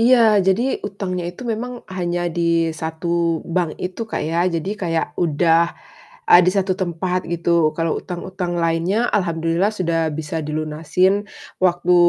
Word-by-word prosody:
Iya, 230 -3 +5
jadi 195 +4 +3 0.3
utangnya 185 -3 -4
itu 175 +8 -9
memang 245 +2 -5
hanya 175 -1 -2
di 170 -1 +1
1 165 +1 -1
bank 170 -2 -1
itu 180 +4 -5
Kak, - - -2
ya. 165 +2 -1
Jadi, 170 +2 -2
kayak 170 -6 -2
udah 165 0 +3 0.6
a 175 - +9
di 180 - +3
1 195 -1 +1
tempat 180 -1 -1
gitu, 170 -2 +2
kalau 165 -1 0
utang-utang 180 0 -5
lainnya 170 +7 +1
alhamdulillah 170 +1 +1
sudah 165 -4 0
bisa 160 +1 -4
dilunasin, 155 +6 0 0.4
waktu 180 -1 +3
175 Hz, 140 wpm, -20 LUFS, 165-185 Hz, 0.6 s, a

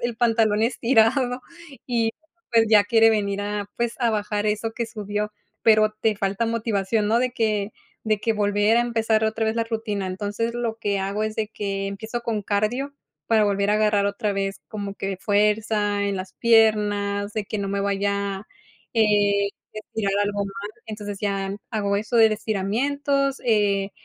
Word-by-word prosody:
el 240 -1 -2
pantalón 225 -2 +2
estirado 245 +1 +2 0.5
y 230 -3 +1 0.4
pues 225 -1 +5
ya 215 -2 +7
quiere 225 +2 +5
venir 200 -2 0
a 205 0 -4
pues 235 -1 -1
a 235 - +3
bajar 210 -1 -1
eso 215 +2 -1
que 235 0 -3
subió, 210 -1 -3 0.3
pero 215 -1 +5
te 220 -2 +1
falta 200 +3 -1
motivación, 220 -2 0
¿no?, 225 +2 +3
de 250 0 +1
que 215 -4 0 0.3
de 215 -2 +1
que 225 +2 0
volver 205 +1 +2
a - - +5
empezar 225 -2 +1
otra 220 +1 0
vez 220 0 0
la 230 - +1
rutina. 220 -4 -3
Entonces 205 +5 -3
lo 235 -2 -2
que 205 -3 -1
hago 195 +2 -2
es 215 0 -4
de 220 - 0
que 200 -2 -3
empiezo 220 +4 -5
con 225 -3 -2
cardio 215 +8 -1 0.4
para 220 -2 +4
volver 200 0 +1
a 210 - +3
agarrar 210 -1 +2
otra 200 +1 -1
vez 195 0 -3
como 200 -2 -5
que 195 -1 -3
fuerza 210 +1 +1
en 200 - -2
las 185 0 -6
piernas 210 -3 +2
de 215 - -2
que 210 +1 -4
no 200 -1 -2
me 200 0 -1
vaya 200 0 -1 0.5
eh, 205 -2 +3 0.3
estirar 215 -2 -3
algo 205 0 -1
mal. 200 +1 -6 0.2
Entonces 205 -2 -6
ya 195 -2 -1 0.2
hago 200 -3 0
eso 215 +3 -2
de 225 -1 +8
estiramientos, 275 +7 -1
eh, 205 -4 +2
210 Hz, 170 wpm, -23 LUFS, 200-225 Hz, 0.5 s, de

